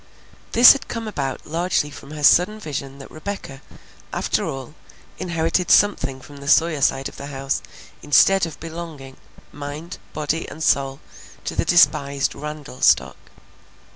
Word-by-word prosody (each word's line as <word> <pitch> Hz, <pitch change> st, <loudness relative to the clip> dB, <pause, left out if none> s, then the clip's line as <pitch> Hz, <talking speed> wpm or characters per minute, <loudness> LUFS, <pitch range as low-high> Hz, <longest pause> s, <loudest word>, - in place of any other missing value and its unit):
This 240 Hz, +2 st, +10 dB
had 275 Hz, -, -7 dB
come 230 Hz, -1 st, -5 dB
about 140 Hz, -10 st, -4 dB
largely 165 Hz, -2 st, -1 dB
from 140 Hz, -, -12 dB
her 150 Hz, -1 st, -7 dB
sudden 180 Hz, +8 st, +5 dB
vision 140 Hz, -6 st, -6 dB
that 135 Hz, -, -12 dB
Rebecca, 155 Hz, -5 st, -7 dB, 0.5 s
after -, -, -1 dB
all, 135 Hz, +1 st, -6 dB, 0.5 s
inherited 170 Hz, +1 st, -1 dB
something 200 Hz, -10 st, +3 dB
from 145 Hz, +2 st, -13 dB
the 140 Hz, 0 st, -10 dB
Sawyer 160 Hz, 0 st, +3 dB
side 135 Hz, 0 st, +1 dB
of -, -, -12 dB
the 140 Hz, -, -7 dB
house 135 Hz, -1 st, -3 dB, 0.4 s
instead 180 Hz, +5 st, +4 dB
of 165 Hz, -, -10 dB
belonging, 160 Hz, -5 st, -8 dB, 0.3 s
mind, 145 Hz, +4 st, -7 dB
body, 155 Hz, +2 st, -2 dB
and 160 Hz, -, -7 dB
soul, 135 Hz, -2 st, +1 dB, 0.4 s
to -, -, -4 dB
the -, -, 0 dB
despised 140 Hz, -5 st, +3 dB
Randall 150 Hz, -2 st, -8 dB
stock. -, -, +3 dB
150 Hz, 145 wpm, -22 LUFS, 140-170 Hz, 0.5 s, This